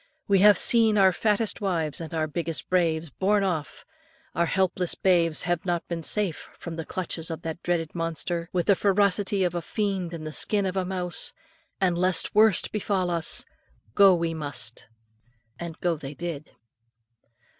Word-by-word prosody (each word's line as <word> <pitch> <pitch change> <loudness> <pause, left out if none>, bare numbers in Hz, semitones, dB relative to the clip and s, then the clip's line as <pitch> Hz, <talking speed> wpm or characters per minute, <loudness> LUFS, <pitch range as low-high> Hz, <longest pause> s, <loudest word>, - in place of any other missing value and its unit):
We 200 -2 +4
have 205 +1 +7
seen 225 -3 +4
our 190 -1 +6
fattest 210 +3 0
wives 170 -6 -1
and 160 - -7
our 160 -1 -1
biggest 160 -2 -3
braves 165 -4 +1
borne 200 +6 +1
off; 165 -6 -3 0.5
our 170 0 +1
helpless 185 -1 0
babes 170 -4 +2
have 175 -1 -1
not 175 -2 -2
been 170 -1 -4
safe 190 0 -2
from 170 -1 -7
the 165 -1 -6
clutches 170 -3 -4
of 165 +1 -6
that 165 +1 -5
dreaded 165 -3 -1
monster, 170 0 -3
with 175 -2 0
the 200 - +4
ferocity 200 0 +1
of 175 -1 0
a 175 - -2
fiend 190 -4 -2
in 160 - -8
the 155 0 -6
skin 205 +3 +2
of 190 0 -2
a 190 -1 0
mouse, 180 -2 -2 0.5
and 180 -3 +1
lest 185 -1 +1
worst 215 -3 +4
befall 195 -4 -1
us, 165 -2 0 0.5
go 195 -2 +6
we 170 -1 -1
must." 145 -7 -3 0.7
And 170 -2 -7
go 175 -2 +1
they 145 0 -8
did. 165 -3 -6
175 Hz, 170 wpm, -26 LUFS, 165-195 Hz, 0.7 s, have